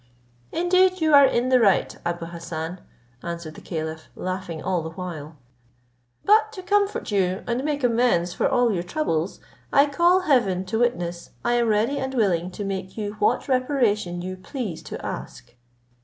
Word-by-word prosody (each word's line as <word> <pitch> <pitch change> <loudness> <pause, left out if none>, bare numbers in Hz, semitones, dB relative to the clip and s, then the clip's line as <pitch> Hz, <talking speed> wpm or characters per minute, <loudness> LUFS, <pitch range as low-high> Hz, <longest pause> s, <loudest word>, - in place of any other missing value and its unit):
"Indeed, 370 +2 +3
you 315 -2 +2
are 280 -1 +9
in 245 +1 0
the 255 -1 +5
right, 200 -5 +3
Abou 170 0 -3
Hassan," 170 +1 -6 0.4
answered 170 -2 -6
the - - -12
caliph, 160 -1 -5
laughing 185 -3 -4
all 180 +1 -1
the 160 - -5
while; 160 -3 -7 0.9
"but 435 +1 +5
to 375 -4 -8
comfort 405 - +1
you, 190 -2 +1
and 240 +2 -1
make 290 -2 -2
you 245 - +4
amends 225 -8 +2
for - - +1
all 245 -4 +3
your 175 - -1
troubles, 175 - -2 0.3
I 280 0 +6
call 345 +6 +3
Heaven 220 - +2
to 220 +4 -2
witness, 175 -8 -1 0.2
I 240 - +2
am 240 -1 +2
ready 220 +6 +1
and 265 0 -3
willing 185 -7 +1
to 200 +3 -6
make 190 0 -5
you 205 -1 -3
what 205 - +1
reparation 235 -9 +1
you 185 0 -5
please 185 - -5
to - - -7
ask." 60 - -7
205 Hz, 170 wpm, -24 LUFS, 175-265 Hz, 0.9 s, are